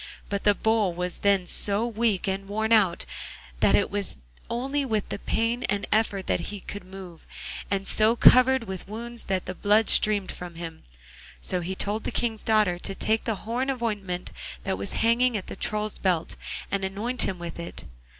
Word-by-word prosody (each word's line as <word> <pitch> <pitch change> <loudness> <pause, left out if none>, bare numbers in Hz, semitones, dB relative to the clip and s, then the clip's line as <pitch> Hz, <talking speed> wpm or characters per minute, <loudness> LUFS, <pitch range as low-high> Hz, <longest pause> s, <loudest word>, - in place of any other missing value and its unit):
But 200 0 -2
the 205 -1 +5
Bull 220 -5 +1
was 180 0 -3
then 200 -2 +3
so 205 +5 +1
weak 225 -4 0
and 195 0 -2
worn 220 +2 0
out 195 -6 +3 0.5
that - - +5
it - - +2
was 200 - -3 0.3
only 270 +4 -1
with 220 -6 -1
pain 230 +2 +1
and 205 0 0
effort 205 -3 +1
that - - +1
he 205 0 -5
could 205 +1 -7
move, 185 -3 -11 0.5
and 195 -1 -1
so 220 +2 +5
covered 255 +1 +6
with 190 -4 -6
wounds 235 +3 -6
that 190 -1 -1
the 185 - -4
blood 210 +3 +3
streamed 205 -3 +4
from 175 -1 -8
him. 165 -1 -7 0.6
So 180 - -2
he 185 +3 -3
told 210 +3 -2
the - - -2
King's 225 -3 -1
daughter 210 -5 +2
to 195 - -3
take 220 +2 0
the 225 - 0
horn 245 +4 -1
of 255 -3 -2
ointment 195 -5 -3 0.3
that 190 -1 -1
was 200 - -3
hanging 235 +1 +3
at 190 - -6
the - - -7
Troll's 210 +2 -2
belt, 180 -4 0 0.4
and 200 -1 0
anoint 210 +6 -2
him 190 - 0
with 170 -1 -7
it. 170 - -7
205 Hz, 190 wpm, -26 LUFS, 190-225 Hz, 0.6 s, covered